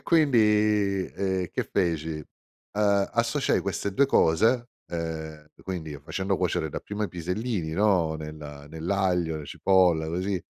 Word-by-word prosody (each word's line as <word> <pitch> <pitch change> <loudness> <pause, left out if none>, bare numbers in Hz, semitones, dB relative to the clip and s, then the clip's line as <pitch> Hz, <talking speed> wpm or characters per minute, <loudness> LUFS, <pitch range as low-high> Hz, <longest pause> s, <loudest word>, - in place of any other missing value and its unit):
E - - -26
quindi, 105 - +3
ehm, 95 -2 0
che - - -1
feci? 80 -4 0 0.5
Ehm, 100 -1 +2
associai 115 +1 +1
queste 100 - -2
2 140 - +5
cose, 115 +4 +3 0.2
ehm, 80 -2 -5
q - - -18
quindi 80 -6 -5
facendo 95 +4 -1
cuocere 90 -3 0
dapprima 105 +7 -4
i - - -3
pisellini, 90 +1 -3
no, 90 -4 +2
nel 75 0 -7 0.3
nell'aglio, 90 -1 0
la 75 - -7
cipolla, 90 -4 +3
così; 90 +3 -2
95 Hz, 135 wpm, -26 LUFS, 80-105 Hz, 0.5 s, 2